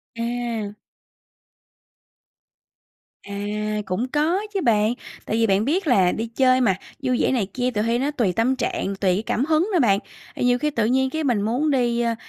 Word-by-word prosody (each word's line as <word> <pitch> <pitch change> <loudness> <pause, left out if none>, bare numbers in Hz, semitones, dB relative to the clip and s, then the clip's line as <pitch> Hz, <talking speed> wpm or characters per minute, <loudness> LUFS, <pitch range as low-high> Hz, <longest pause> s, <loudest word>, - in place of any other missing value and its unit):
À. 230 -3 -3 2.5
À, 210 +1 -3
cũng 190 +7 -2
có 310 +7 +1
chứ 390 - 0
bạn, 220 -4 +2 0.3
tại 220 - -2
vì 230 - +3
bạn 195 +2 +2
biết 330 +5 0
là 190 -8 +4
đi 225 +2 -3
chơi 255 +2 +3
mà, 205 -7 +3 0.3
vui 255 -2 +1
vẻ - - +2
này 240 -6 +1
kia 250 0 -1
tuỳ 210 - -1
hy 230 +1 +1
nó 280 +3 0
tùy 230 -11 0
tâm 235 +7 +1
trạng, 250 -2 -2
tùy 190 -2 +1
cái 205 - -2
cảm 260 - 0
hứng 320 +4 +2
nữa 355 - +3
bạn. 200 -7 +3 0.4
À, - - -6
nhiều 245 0 +3
khi 300 +2 0
tự 230 -6 0
nhiên 265 +2 +2
cái 315 +3 -3
mình 240 -7 +1
muốn 245 +9 0
đi, 240 -3 +1
ơ, 230 -1 0
235 Hz, 195 wpm, -23 LUFS, 210-265 Hz, 2.5 s, là